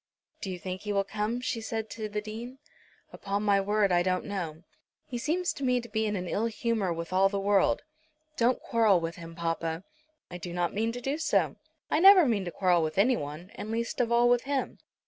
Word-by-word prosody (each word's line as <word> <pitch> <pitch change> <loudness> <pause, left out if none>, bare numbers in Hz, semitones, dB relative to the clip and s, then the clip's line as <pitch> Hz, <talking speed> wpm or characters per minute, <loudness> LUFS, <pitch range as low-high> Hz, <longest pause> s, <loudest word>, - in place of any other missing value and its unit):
"Do 195 - -4
you 185 - -4
think 185 +1 -6
he 210 - -4
will 200 0 +2
come?" 210 +4 -2
she 235 -2 -2
said 225 -1 -3
to 215 -2 -5
the 210 0 -3
Dean. 230 +5 -7 0.6
"Upon 200 +1 -3
my 200 -1 +3
word 205 0 +2
I 175 0 +4
don't 185 0 0
know. 175 -5 -5 0.4
He 245 - -5
seems 345 +7 0
to 280 - -7
me 250 -1 +2
to 235 - -8
be 220 -1 -1
in 210 - -1
an 180 -2 -3
ill 220 +6 0
humour 225 -4 -1
with 170 +1 -4
all 190 +1 +4
the 200 0 -2
world." 200 0 +2 0.5
"Don't 245 0 +2
quarrel 220 -5 +3
with 165 +1 -4
him, 165 -1 -9
papa." 165 0 -2 0.5
"I 175 - -6
do 175 0 -6
not 175 -1 -1
mean 225 +2 0
to 245 - -6
do 275 +5 -2
so. 315 - +1 0.3
I 310 - +3
never 380 -1 +9
mean 215 -7 +1
to 175 - -4
quarrel 180 -2 +2
with 155 +1 -2
anyone, 185 - 0
and 215 - -7
least 230 +2 -1
of 235 -1 0
all 240 +1 +5
with 245 0 +3
him. 275 -1 -2
210 Hz, 225 wpm, -29 LUFS, 180-235 Hz, 0.6 s, never